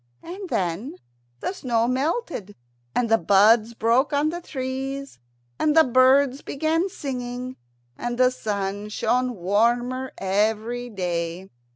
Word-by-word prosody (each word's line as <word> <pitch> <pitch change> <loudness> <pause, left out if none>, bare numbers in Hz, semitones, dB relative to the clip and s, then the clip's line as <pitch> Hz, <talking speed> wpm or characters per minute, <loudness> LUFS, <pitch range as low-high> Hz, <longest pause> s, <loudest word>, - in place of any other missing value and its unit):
And 370 +2 -7
then 185 - -2 0.5
the - - -2
snow 235 -9 0
melted, 265 - -2 0.4
and 245 - +2
the 225 0 +3
buds 215 +5 +4
broke 235 +5 +2
on 290 +2 +2
the 345 +2 -5
trees, 270 - -5 0.4
and 310 +1 +2
the 320 - +9
birds 260 +1 +4
began 320 +6 0
singing, 255 -5 -5 0.4
and 240 0 -3
the 255 0 +4
sun 205 -3 -3
shone 250 +3 0
warmer 240 +7 +1
every 220 +5 0
dry. 175 -2 -3
245 Hz, 120 wpm, -24 LUFS, 210-270 Hz, 0.5 s, the